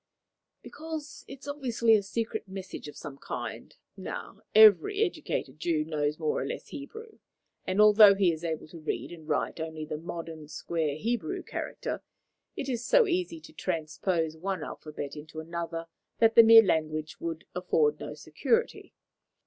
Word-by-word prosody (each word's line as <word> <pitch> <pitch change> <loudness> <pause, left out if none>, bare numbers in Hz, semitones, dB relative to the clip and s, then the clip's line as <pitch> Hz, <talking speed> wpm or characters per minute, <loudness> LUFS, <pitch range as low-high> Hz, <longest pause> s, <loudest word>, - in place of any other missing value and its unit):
"Because 315 -2 -7
it 270 0 -10
is - - -12
obviously 245 -6 +2
a 215 - +5
secret 220 +2 -3
message 190 -4 -7
of 150 - -10
some 140 -3 -8
kind. - - -6 0.2
Now, - - -7
every 220 - +7
educated 295 - -3
Jew 155 -2 0
knows 150 -1 -1
more 155 -2 -1
or - - -2
less - - -6
Hebrew, 440 +11 -9 0.5
and, 185 +2 0
although 210 -1 +8
he 195 -3 +3
is 160 +1 -8
able 160 -2 -3
to 165 - -10
read 155 - -4
and 160 -2 -11
write 150 - -1
only 160 -1 -5
the 150 0 -5
modern 165 -2 -7
square 155 -1 -2
Hebrew 230 +7 -2
character, - - -5 0.5
it 275 - -4
is 245 -3 -2
so - - +5
easy 350 -3 -1
to 310 - -14
transpose 165 - -2
one 190 +3 -3
alphabet 150 -2 -7
into 155 +1 -9
another 165 0 -4 0.3
that 225 0 +4
the 230 - +10
mere 225 0 +9
language 155 -4 -1
would 335 -1 -5
afford 445 -1 +1
no - - -6
security. 465 0 -1
185 Hz, 160 wpm, -29 LUFS, 160-255 Hz, 0.5 s, the